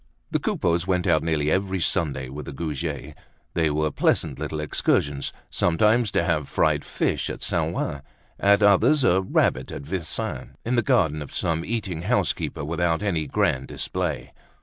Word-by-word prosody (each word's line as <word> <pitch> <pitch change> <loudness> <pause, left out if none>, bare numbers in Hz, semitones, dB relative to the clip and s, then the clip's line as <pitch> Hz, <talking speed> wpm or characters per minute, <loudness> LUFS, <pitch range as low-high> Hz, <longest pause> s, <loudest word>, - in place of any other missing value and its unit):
The - - +1
Coupeaus 85 +1 0
went 90 -2 +1
out 80 - +3
nearly 75 -2 0
every 95 0 0
Sunday 75 -7 0
with 70 +4 -8
the - - -5
Goujets. 75 0 -4 0.4
They 80 -2 +2
were 75 +1 0
pleasant 70 -1 +1
little 75 0 -3
excursions, 70 -2 0 0.2
sometimes 105 +7 +3
to - - +2
have 85 -3 +2
some - - -16
fried - - +2
fish - - -1
at - - -6
Saint - - 0
Ouen, 70 - -2 0.4
at 100 +1 +4
others 105 +9 +5
a 95 -5 +4
rabbit 65 -8 +1
at 70 - -6
Vincennes, 85 +1 -4
in 120 - 0
the 120 - +4
garden 80 - +2
of 75 - -8
some 80 0 0
eating 95 -6 -3
house 90 - +2
keeper - - -5
without 85 +2 0
any 85 -7 0
grand 65 0 0
display. - - -3
80 Hz, 170 wpm, -24 LUFS, 75-95 Hz, 0.4 s, others